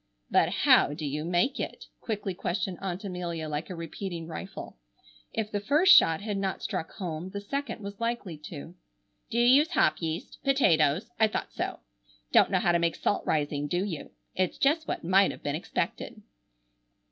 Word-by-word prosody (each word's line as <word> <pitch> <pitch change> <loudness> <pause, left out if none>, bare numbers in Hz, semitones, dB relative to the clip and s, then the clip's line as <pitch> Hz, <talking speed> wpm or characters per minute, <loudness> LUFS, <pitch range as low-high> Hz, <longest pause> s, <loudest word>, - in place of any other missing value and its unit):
"But - - +4 0.2
how 145 - +6
do 155 -1 -5
you 150 +2 -2
make 175 - +1
it?" - - -5
quickly 205 -4 -3
questioned 180 +1 -3
Aunt 190 0 -4
Amelia, 175 -4 -4
like 150 +1 -4
a 185 - -5
repeating 170 +1 -5
rifle. 165 - -8 0.5
If 220 -1 -3
the 205 - -1
first 305 - +6
shot 165 - +5
had 205 -1 -3
not 195 -1 -2
struck 160 - -3
home, 175 -3 -5
the 200 +1 -5
second 235 +2 -4
was 200 0 -7
likely 230 -7 -2
to. 70 - -8 0.6
"Do 230 - -3
you 240 - +4
use 280 +6 +6
hop 155 0 +3
yeast? 165 +1 -4
Potatoes? 200 - +3
I 220 - +6
thought 215 - -4
so. - - -4 0.5
Don't - - +6
know - - +2
how 175 - +2
to 170 - +3
make 170 -1 +1
salt 205 - 0
rising, 145 -1 0
do 175 +5 0
you? 170 -7 -5 0.2
It's 185 -1 -1
just 310 +3 +2
what - - -3
might 190 +3 +4
have - - -8
been 145 0 -1
expected." 160 - -3
185 Hz, 180 wpm, -28 LUFS, 165-215 Hz, 0.6 s, how